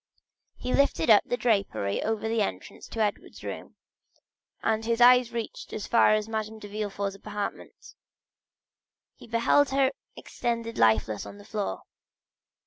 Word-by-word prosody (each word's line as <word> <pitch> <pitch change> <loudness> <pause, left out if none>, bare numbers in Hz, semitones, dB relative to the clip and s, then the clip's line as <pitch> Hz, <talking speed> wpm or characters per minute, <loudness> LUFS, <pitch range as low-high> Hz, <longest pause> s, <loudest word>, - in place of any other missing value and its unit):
He 250 - -3
lifted 235 -9 +3
up 210 - +8
the 245 - -1
drapery 200 - 0
over 220 0 -1
the 225 0 +1
entrance 200 - -5
to 225 - -4
Edward's 210 -1 -3
room, - - -7 0.9
and 220 0 +1
his 230 +1 0
eye 250 +1 +8
reaching 230 -2 -6
as 210 - -4
far 225 -2 +4
as 215 0 -2
Madame 220 0 -4
de 210 - -10
Villefort's 205 -1 -3
apartment, 205 +1 -7 1.2
he - - -15
beheld 235 +5 +3
her 270 0 +2 0.2
extended 230 -1 -4
lifeless 110 -1 +2
on 200 - -10
the 205 - -14
floor. 210 -2 -4
220 Hz, 140 wpm, -27 LUFS, 205-235 Hz, 1.2 s, up